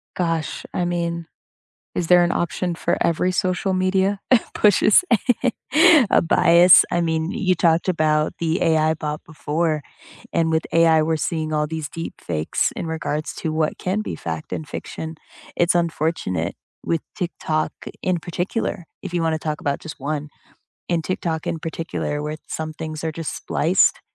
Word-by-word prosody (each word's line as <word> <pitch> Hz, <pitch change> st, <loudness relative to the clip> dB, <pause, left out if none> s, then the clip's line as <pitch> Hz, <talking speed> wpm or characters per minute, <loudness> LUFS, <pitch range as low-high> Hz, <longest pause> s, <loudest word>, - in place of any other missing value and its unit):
Gosh, 165 Hz, -3 st, -2 dB
I 180 Hz, -, 0 dB
mean, 170 Hz, -1 st, -2 dB, 0.7 s
is 175 Hz, -, -2 dB
there 180 Hz, 0 st, +6 dB
an 175 Hz, -, +1 dB
option 175 Hz, +1 st, -1 dB
for 170 Hz, +1 st, -1 dB
every 175 Hz, +2 st, +2 dB
social 185 Hz, +1 st, 0 dB
media 190 Hz, +2 st, +1 dB, 0.4 s
pushes 210 Hz, -, +5 dB, 1.1 s
a -, -, +4 dB
bias? 170 Hz, +2 st, +7 dB
I 175 Hz, -, +1 dB
mean, 160 Hz, -1 st, 0 dB
you 185 Hz, -3 st, +1 dB
talked 165 Hz, -1 st, +2 dB
about 155 Hz, -3 st, +1 dB
the 165 Hz, +2 st, 0 dB
AI 160 Hz, -1 st, +3 dB
bot 150 Hz, -1 st, -4 dB
before, 155 Hz, -1 st, -2 dB, 0.5 s
and 165 Hz, -1 st, +2 dB
with 160 Hz, 0 st, +1 dB
AI, 165 Hz, -1 st, +5 dB
we're 160 Hz, 0 st, 0 dB
seeing 155 Hz, 0 st, -2 dB
all 150 Hz, 0 st, +1 dB
these 160 Hz, -2 st, -4 dB
deep 165 Hz, 0 st, -6 dB
fakes 80 Hz, -2 st, -1 dB
in 170 Hz, -, -4 dB
regards 155 Hz, -1 st, -3 dB
to 160 Hz, -, -3 dB
what 155 Hz, -1 st, 0 dB
can 190 Hz, +4 st, -1 dB
be -, -, -5 dB
fact 80 Hz, -2 st, -6 dB
and 155 Hz, -, -4 dB
fiction. 160 Hz, +2 st, -6 dB, 0.4 s
It's 175 Hz, 0 st, +2 dB
unfortunate 155 Hz, -, -1 dB, 0.3 s
with 165 Hz, -2 st, 0 dB
TikTok 160 Hz, -4 st, -2 dB, 0.3 s
in 185 Hz, -1 st, +1 dB
particular- 175 Hz, +2 st, -3 dB, 0.2 s
if 190 Hz, -3 st, -6 dB
you 175 Hz, -, +1 dB
wanna 160 Hz, -1 st, +1 dB
talk 155 Hz, -1 st, -4 dB
about 140 Hz, -1 st, -1 dB
just 155 Hz, -, -9 dB
one- 150 Hz, +1 st, -3 dB, 0.6 s
in 170 Hz, -2 st, +1 dB
TikTok 165 Hz, -3 st, -2 dB
in 165 Hz, -, -2 dB
particular, 160 Hz, -2 st, -3 dB
where 150 Hz, +1 st, -3 dB
some 155 Hz, 0 st, -4 dB
things 155 Hz, 0 st, -6 dB
are 160 Hz, -, -1 dB
just 165 Hz, -1 st, -4 dB
spliced, -, -, +2 dB
165 Hz, 160 wpm, -22 LUFS, 155-175 Hz, 1.1 s, bias